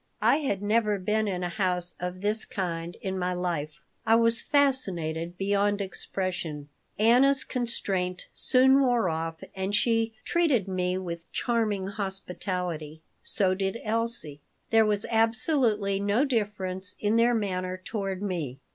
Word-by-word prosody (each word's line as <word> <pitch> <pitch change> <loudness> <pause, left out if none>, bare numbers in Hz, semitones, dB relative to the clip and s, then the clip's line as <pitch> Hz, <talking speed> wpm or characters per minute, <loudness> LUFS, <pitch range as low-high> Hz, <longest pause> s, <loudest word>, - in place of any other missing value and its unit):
I - - +5
had 205 -10 -2
never 210 0 +2
been 215 +3 0
in 180 -2 -2
a 175 - -1
house 180 -3 +1
of 180 +1 -4
this 210 +2 +1
kind 170 -3 -4
in 190 -1 -3
my 180 0 0
life. 170 -4 -3 0.2
I 225 0 +4
was 230 0 +3
fascinated 180 - 0
beyond 200 +1 +1
expression 180 -6 -4 0.3
Anna's 260 +5 +5
constraint 195 -7 -2
soon 265 +2 +4
wore 245 -7 +2
off 160 0 -4
and 190 +2 -1
she 225 +1 +1
treated 295 - +2
me 185 -1 -1
with 170 -2 -6
charming 220 -5 0
hospitality. 180 -5 -4 0.2
So 190 -3 +1
did 195 +2 -2
Elsie. 220 -10 -2 0.3
There 225 -1 +5
was 210 0 +1
absolutely 225 -3 +2
no 205 +7 +2
difference 200 -6 -2
in 210 +1 +1
their 235 +1 +4
manner 185 -3 -2
toward 195 0 -4
me. 165 -10 -3
200 Hz, 140 wpm, -27 LUFS, 180-225 Hz, 0.3 s, I